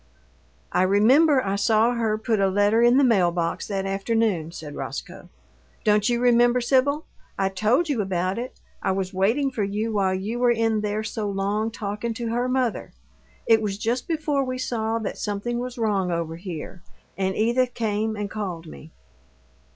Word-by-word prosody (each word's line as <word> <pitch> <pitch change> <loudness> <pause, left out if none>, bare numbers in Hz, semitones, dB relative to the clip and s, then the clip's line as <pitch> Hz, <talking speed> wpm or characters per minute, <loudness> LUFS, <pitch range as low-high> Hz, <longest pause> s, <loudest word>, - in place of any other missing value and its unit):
"I 180 - +2
remember 255 - +4
I 195 0 0
saw 220 +3 +3
her 225 -3 0
put 220 0 0
a 195 - +3
letter 205 +4 +3
in 240 +2 +5
the 280 - +5
mail 200 -9 +4
box 170 -1 -2
that 195 -2 -2
afternoon," 195 -4 0
said 155 -3 -8
Roscoe. - - -7 0.5
"Don't 210 0 +3
you 240 -1 +1
remember, 240 0 +4
Sibyl? 270 +5 +1 0.3
I 195 - +1
told 220 - +1
you 275 -8 0
about 185 +1 -1
it 250 +2 -7 0.2
I 190 - 0
was 190 0 -3
waiting 230 +9 +1
for 230 -5 -2
you 210 +3 -2
while 190 -2 +1
you 210 +6 -3
were 245 0 +3
in 225 -2 +1
there 210 +1 -2
so 215 -1 -3
long 200 +3 -1
talking 220 +1 -4
to 235 0 -3
her 240 +2 0
mother. 255 -3 -1 0.5
It 225 -1 +4
was 200 -2 -2
just 235 +4 -2
before 300 -4 0
we 255 -1 -3
saw 225 -3 -1
that 220 -3 -4
something 210 +4 -2
was 250 +1 -5
wrong 200 -5 0
over 165 -1 -2
here, 175 0 -7 0.3
and 190 -1 -1
Edith 240 +3 +1
came 220 -1 -1
and 205 -1 -3
called 190 -5 -5
me." 155 0 -11
215 Hz, 180 wpm, -24 LUFS, 195-240 Hz, 0.5 s, in